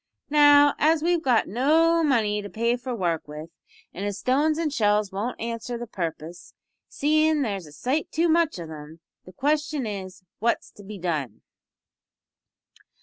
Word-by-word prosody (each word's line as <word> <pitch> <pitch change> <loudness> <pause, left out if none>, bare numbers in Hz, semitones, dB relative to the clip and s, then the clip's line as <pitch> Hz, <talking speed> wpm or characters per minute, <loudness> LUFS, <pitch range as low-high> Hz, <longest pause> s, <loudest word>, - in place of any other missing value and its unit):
Now, 290 -1 +6
as 315 +1 +3
we've 345 0 +2
got 250 -7 +2
no 325 - +3
money 220 -8 +1
to 205 - -8
pay 235 +3 0
for 245 0 -5
work 170 -7 -2
with, 150 +2 -9 0.4
and 195 - -6
as 205 -1 -3
stones 295 +5 +1
an' 325 -2 -1
shells 210 -4 +1
won't 210 +6 -4
answer 230 +1 -4
the 240 - -6
purpus 170 -4 -6 0.3
seein' 310 0 +2
there's 200 -8 -4
a - - -14
sight 255 - -2
too 330 +2 +1
much 330 - +2
of 165 -2 -8
'em 155 +1 -10 0.3
the 185 - -12
question 295 - -1
is, 190 -3 -7 0.2
what's 235 +2 -1
to 205 - -15
be 205 +1 -8
done?" 155 - -4
235 Hz, 160 wpm, -25 LUFS, 190-295 Hz, 0.4 s, Now